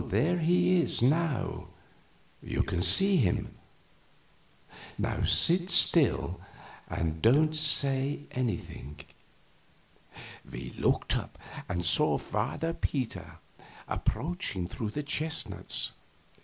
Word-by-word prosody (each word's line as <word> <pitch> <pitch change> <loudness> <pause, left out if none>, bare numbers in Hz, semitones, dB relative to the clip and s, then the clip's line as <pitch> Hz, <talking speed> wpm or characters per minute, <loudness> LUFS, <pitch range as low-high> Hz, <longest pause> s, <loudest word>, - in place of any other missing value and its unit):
There 175 +3 0
he 175 +2 +2
is 140 - +2
now; 150 0 -1 0.7
you - - -2
can 90 - -3
see 190 - +6
him. 100 - -1 1.7
Sit 175 +2 +4
still, 170 -5 +3 0.5
and 80 -1 -4
don't 155 +7 +3
say 140 -2 +3
anything." 100 - -5 1.5
We 60 0 -8
looked - - -1
up - - -6 0.3
and 90 -1 -3
saw - - +2
Father 125 +10 -4
Peter 110 - -5 0.5
approaching 155 - -3
through 110 +3 -6
the 150 +8 -5
chestnuts. 155 +2 -2
140 Hz, 90 wpm, -28 LUFS, 100-165 Hz, 1.7 s, see